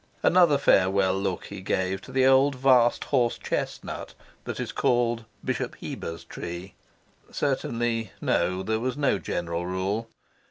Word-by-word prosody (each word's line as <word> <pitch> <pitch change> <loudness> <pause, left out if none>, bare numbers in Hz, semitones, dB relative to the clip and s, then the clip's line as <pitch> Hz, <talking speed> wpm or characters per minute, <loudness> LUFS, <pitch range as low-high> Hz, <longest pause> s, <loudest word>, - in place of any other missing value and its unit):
Another 170 -5 +5
farewell 95 -6 +3
look 95 -2 -2
he 100 -2 -8
gave 95 0 -1
to 130 - -12
the 130 0 +3
old 135 +1 +5
vast 125 -2 +4
horse 125 -4 +1
chestnut - - -4 0.3
that - - -5
is - - -3
called 120 -2 +1 0.2
Bishop - - -2
Heber's 80 0 -6
tree. 85 +2 -7 0.6
Certainly, 120 -4 -1
no: 90 +1 0
there 110 +3 0
was 130 +4 -2
no 140 -8 +2
general 85 0 -3
rule. 95 +5 -2
115 Hz, 135 wpm, -26 LUFS, 95-130 Hz, 0.6 s, Another